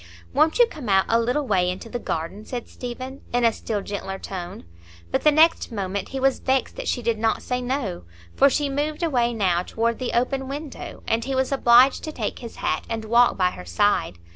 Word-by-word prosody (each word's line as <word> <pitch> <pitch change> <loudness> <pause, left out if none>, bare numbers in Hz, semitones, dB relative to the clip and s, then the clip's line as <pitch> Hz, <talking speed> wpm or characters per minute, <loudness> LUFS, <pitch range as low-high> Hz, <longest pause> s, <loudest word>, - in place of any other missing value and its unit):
"Won't 315 - +3
you 485 - +7
come 300 - -8
out 190 -1 +4
a 230 - +4
little 250 +5 0
way 185 -6 +2
into 185 +5 -5
the 240 +2 -4
garden?" 170 +2 -4
said 240 +1 -6
Stephen, 255 +2 -7
in 245 0 +2
a 230 - +4
still 210 -3 -3
gentler 195 -1 -5
tone; 180 - -7 0.5
but - - 0
the 300 - +6
next 315 -1 +4
moment 200 -2 -3
he 270 - -4
was 270 0 +2
vexed 265 -1 0
that - - -5
she 245 - -1
did 225 -1 0
not 225 0 0
say 250 0 -2
"No," 245 - -3 0.3
for 275 - +6
she 290 +1 0
moved 295 +4 -2
away 245 -7 +2
now 190 -6 +1
toward 230 +5 -1
the 255 - -3
open 265 +2 0
window, 285 +1 -7
and 230 +1 +1
he 270 0 -2
was 265 +1 0
obliged 255 0 +5
to 310 - -4
take 225 -8 -4
his 235 -2 -9
hat - - -1
and 225 -1 -3
walk 235 +2 +4
by 180 -1 +2
her 90 - -9
side. 90 - +1
240 Hz, 215 wpm, -24 LUFS, 205-270 Hz, 0.5 s, you